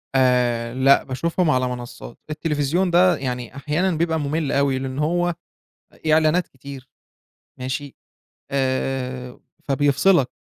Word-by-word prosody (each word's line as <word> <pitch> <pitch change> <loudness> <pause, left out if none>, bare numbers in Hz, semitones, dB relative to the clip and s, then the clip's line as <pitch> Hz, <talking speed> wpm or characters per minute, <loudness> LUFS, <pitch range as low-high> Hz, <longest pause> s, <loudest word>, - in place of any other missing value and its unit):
آآ 125 -2 +2
لأ، 135 +2 +4
باشوفهم 165 +6 -1
على 130 -3 +2
منصّات. 120 -1 -7
التليفزيون 155 +3 0
ده 180 +1 +5
يعني 125 -2 -4
أحيانًا 155 +7 0
بيبقى 165 0 0
مُمِل 150 0 -1
أوي، 140 -1 +1
لإن 130 +1 -4
هو 175 +3 +1 0.6
آآ 155 - -3
إعلانات 160 +3 +3
كتير 135 0 -11 0.7
ماشي، 130 +2 -4 0.6
آآ 130 -2 -2 0.2
فبيفصلك. 140 +2 +3
140 Hz, 115 wpm, -22 LUFS, 130-155 Hz, 0.7 s, ده